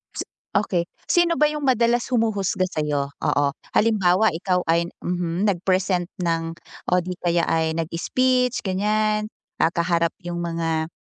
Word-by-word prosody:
Si - - -3 0.3
okey, 190 -4 +1 0.2
sino 345 -1 +3
ba 300 - +5
'yung 300 0 -4
madalas 240 -1 +2
humuhusga 205 -6 +1
sa'yo? 145 -3 -2
Oo. 145 - +2 0.3
Halimbawa 210 -2 +3
ikaw 180 +2 0
ay, 170 +1 +1 0.2
mhm, 175 +1 -1
nag-present 185 -1 0
ng 165 -1 -1 0.4
o - - +1
di 180 +1 -4
kaya 170 -1 +2
ay 160 -1 +1
nag-speech 250 +11 0
ganiyan, 215 +2 0 0.3
ah, - - +5
kaharap 170 -1 +1
'yung 175 0 -3
mga, 165 -1 -1
180 Hz, 135 wpm, -23 LUFS, 170-215 Hz, 0.4 s, ba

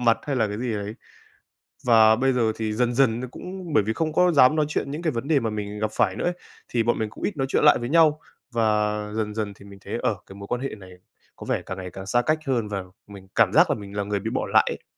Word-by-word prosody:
mặt 115 -2 +3
hay 140 -2 -2
là 115 -3 +2
cái 105 +1 -5
gì 120 0 -2
đấy. 105 +1 -4 0.9
Và 110 -2 +6
bây 130 +2 +2
giờ 115 -3 +1
thì 110 -1 -2
dần 120 +2 0
dần 120 -3 +2
nó 130 - -4
cũng 180 +2 -8
bởi 110 - +5
vì 110 +2 -1
không 155 +6 -2
có 180 +2 +3
dám 140 0 +6
nói 155 -1 +2
chuyện 150 - -2
những 150 +4 -5
cái 165 - +1
vấn 120 +3 -4
đề 155 -4 +3
mà 115 - -1
mình 105 -1 -5
gặp 110 0 0
phải 95 -2 +2
nữa - - -3
ấy, 175 - +1 0.3
thì 120 - +1
bọn 120 +1 +1
mình 110 -1 -2
cũng - - -9
ít 205 - -1
nói 135 -2 0
chuyện - - +2
lại 150 - +7
với 120 - -4
nhau 155 0 +4 0.3
và 105 -2 +1 0.2
dần 105 -1 -2
dần 105 -2 -3
thì 100 - -16
mình 100 -1 -13
thấy, - - -4
ờ, - - +1
cái 95 - -12
mối 100 0 -9
quan 125 - -1
hệ 135 - -4
này 95 -2 -13 0.5
có - - -9
vẻ - - -1
càng 95 - -5
ngày 90 -1 -6
càng 95 +2 -9
xa 120 +5 +2
cách 155 +5 +1
hơn, 120 -5 0
và 100 -2 -3 0.2
mình 100 -2 -13
cảm - - +4
giác - - +5
là - - +1
mình 100 -1 -9
là 100 - -1
người 100 0 -2
bị 110 - -3
bỏ - - -1
lại - - +4
ấy. - - -9
115 Hz, 295 wpm, -24 LUFS, 105-135 Hz, 0.9 s, lại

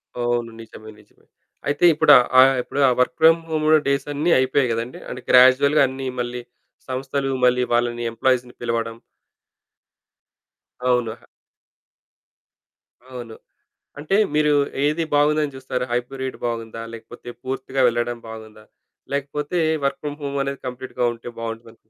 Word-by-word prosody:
అవును. 120 -1 -1
నిజమే. 110 -1 -12
నిజమే. 105 - -25 0.4
అయితే 145 +4 +2
ఇప్పుడు 150 -1 +4 0.3
ఆహ్, 135 +1 +7
ఇప్పుడు 140 - -5
ఆ - - +2
వర్క్ 125 0 +2
ఫ్రమ్ 165 +1 +6
హోమ్‌ 155 -1 -1 0.2
డేస్ 140 0 0
అన్నీ 155 +4 0
అయిపోయాయి 130 0 +1
కదండీ! 115 +2 -4
అంటే 125 - -7
గ్రాడ్యుయల్‌గా 130 +4 +6
అన్నీ 130 0 -6
మళ్ళీ 120 0 -3 0.5
సంస్థలు, 135 +1 -2
మళ్ళీ 125 0 +3
వాళ్ళని 120 0 0
ఎంప్లాయీస్‌ని 125 +1 0
పిలవడం. 115 -1 -2 1.9
అవును. 125 -3 +1
ఆహా! 115 - -19 1.8
అవును. 120 -3 -8 0.6
అంటే, 155 +6 -1 0.2
మీరు 150 0 +3 0.3
ఏది 155 +3 0
బాగుందని 150 0 +2
చూస్తారు. 130 -1 -4
హైబ్రిడ్ 130 +2 -3
బాగుందా? 115 -1 -5
లేకపోతే 115 +2 -11
పూర్తిగా 130 0 -3
వెళ్ళడం 120 0 -1
బాగుందా? 110 -1 -11 0.5
లేకపోతే 145 +4 -2 0.3
వర్క్ 140 - -2
ఫ్రమ్ 145 0 -5
హోమ్ 140 0 -3
అనేది 140 0 -4
కంప్లీట్‌గా 125 0 -4
ఉంటే 115 +1 -10
బాగుంటుందా? 115 -1 -8
130 Hz, 125 wpm, -22 LUFS, 120-140 Hz, 1.9 s, ఆహ్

